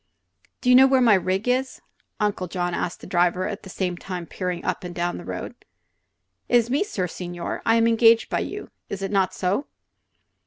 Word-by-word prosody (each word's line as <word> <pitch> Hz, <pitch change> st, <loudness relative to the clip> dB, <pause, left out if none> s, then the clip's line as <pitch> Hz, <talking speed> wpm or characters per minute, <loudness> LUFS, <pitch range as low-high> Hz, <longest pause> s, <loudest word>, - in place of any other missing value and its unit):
"Do 250 Hz, -, 0 dB
you -, -, +8 dB
know 265 Hz, +1 st, +8 dB
where 265 Hz, -1 st, +4 dB
my 235 Hz, -4 st, +5 dB
rig 190 Hz, +3 st, 0 dB
is?" 255 Hz, +1 st, 0 dB, 0.4 s
Uncle 205 Hz, -3 st, -1 dB
John 175 Hz, 0 st, -2 dB
asked 170 Hz, -, -3 dB
the -, -, -9 dB
driver, 180 Hz, +1 st, +1 dB
at 205 Hz, -1 st, -5 dB
the 190 Hz, -, -11 dB
same 180 Hz, -1 st, -2 dB
time 180 Hz, -1 st, -6 dB
peering 180 Hz, 0 st, -4 dB
up -, -, -2 dB
and 175 Hz, -1 st, -7 dB
down 175 Hz, +1 st, -2 dB
the -, -, -9 dB
road. -, -, -6 dB, 1.0 s
"It -, -, +3 dB
is 235 Hz, 0 st, +1 dB
me, 285 Hz, +8 st, +2 dB
sir 200 Hz, -, -3 dB
signore. 175 Hz, 0 st, -5 dB
I 225 Hz, -, +5 dB
am 230 Hz, 0 st, +4 dB
engage 230 Hz, 0 st, +5 dB
by -, -, -1 dB
you. -, -, -6 dB, 0.2 s
Is 195 Hz, -1 st, -5 dB
it 195 Hz, -, -3 dB
not 190 Hz, -2 st, +1 dB
so?" 195 Hz, +10 st, -1 dB
190 Hz, 205 wpm, -24 LUFS, 180-230 Hz, 1.0 s, you